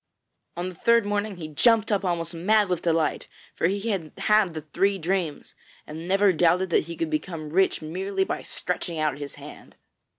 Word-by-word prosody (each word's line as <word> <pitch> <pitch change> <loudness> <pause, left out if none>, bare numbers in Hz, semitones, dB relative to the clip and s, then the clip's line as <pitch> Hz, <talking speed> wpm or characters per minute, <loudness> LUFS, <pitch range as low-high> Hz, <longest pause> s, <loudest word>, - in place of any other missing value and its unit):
On 175 +1 -2
the - - -9
third 235 +5 +3
morning 205 0 -1
he 160 -3 -6
jumped 225 - +3
up 205 -1 +1
almost 170 -2 -1
mad 200 +4 +2
with 180 -2 -1
delight, 165 -2 0 0.3
for - - +1
he 200 +4 -2
had 165 -6 -3
had 210 -5 +3
the 155 - -4
three 195 +6 +1
dreams, 175 -3 -2 0.3
and 160 +3 -8
never 195 +1 +4
doubted 175 +2 +2
that - - +3
he 170 +1 -7
could 160 -1 -2
become 155 -1 -4
rich 190 -1 +2
merely 190 +5 -2
by - - -3
stretching 175 -2 -4
out 150 -3 0
his 145 -1 -7
hand. - - -12
180 Hz, 190 wpm, -25 LUFS, 160-200 Hz, 0.3 s, never